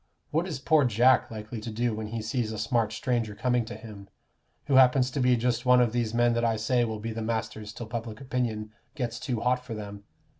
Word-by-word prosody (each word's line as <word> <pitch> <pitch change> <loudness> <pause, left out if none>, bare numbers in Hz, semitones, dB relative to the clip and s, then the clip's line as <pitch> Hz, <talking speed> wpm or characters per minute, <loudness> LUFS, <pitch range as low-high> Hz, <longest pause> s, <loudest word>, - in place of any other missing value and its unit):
What 165 +4 0
is 165 - -4
poor 150 +2 +3
Jack 125 +2 +4
likely 110 0 -7
to 115 - -5
do 115 +1 -1
when 110 0 -4
he 110 +1 -4
sees 110 0 -1
a 110 - -5
smart 110 0 0
stranger 115 -1 -1
coming 125 +1 +1
to - - -7
him, 100 -4 -11 0.6
who 140 - -1
happens 130 0 +5
to 140 - -3
be 125 -1 +4
just 120 0 0
one 125 -1 +5
of 120 -2 +3
these 115 -2 -1
men 120 +1 +3
that 115 0 0
I 115 -1 +2
say 120 +3 +1
will 110 -1 -3
be 115 +2 -4
the 115 - -4
masters 110 -1 -3
till 120 - -7
public 115 0 -5
opinion 120 -5 -2 0.2
gets 120 -5 -3
too 120 -5 -3
hot 125 0 +1
for 120 -3 -6
them? 100 -1 -8
115 Hz, 230 wpm, -28 LUFS, 110-125 Hz, 0.6 s, happens